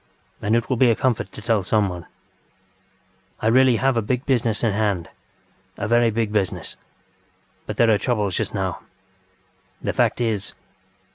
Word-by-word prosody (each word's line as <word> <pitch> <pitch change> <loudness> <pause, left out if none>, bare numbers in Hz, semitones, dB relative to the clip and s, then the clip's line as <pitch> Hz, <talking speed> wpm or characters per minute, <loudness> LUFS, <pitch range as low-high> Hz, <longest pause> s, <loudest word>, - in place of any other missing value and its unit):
And 110 +2 +1
it 115 0 0
will 130 - 0
be 125 0 +5
a 115 - +3
comfort 115 -7 -1
to 110 - -10
tell 110 -2 +2
someone. 95 -3 -1 1.3
I - - -5
really 125 +2 +5
have 130 +1 +1
a - - +2
big 125 +5 -2
business 120 -5 +1
in 115 - +3
hand, 100 -5 -1 0.7
a 105 - -3
very 120 +1 +4
big 110 -1 -1
business. 100 -4 -1 0.9
But - - -5
there 115 -1 +4
are 105 - +3
troubles 105 -5 0
just - - -1
now. - - -2 1.0
The - - -2
fact - - +1
is 110 -4 -2
110 Hz, 160 wpm, -22 LUFS, 105-120 Hz, 1.3 s, be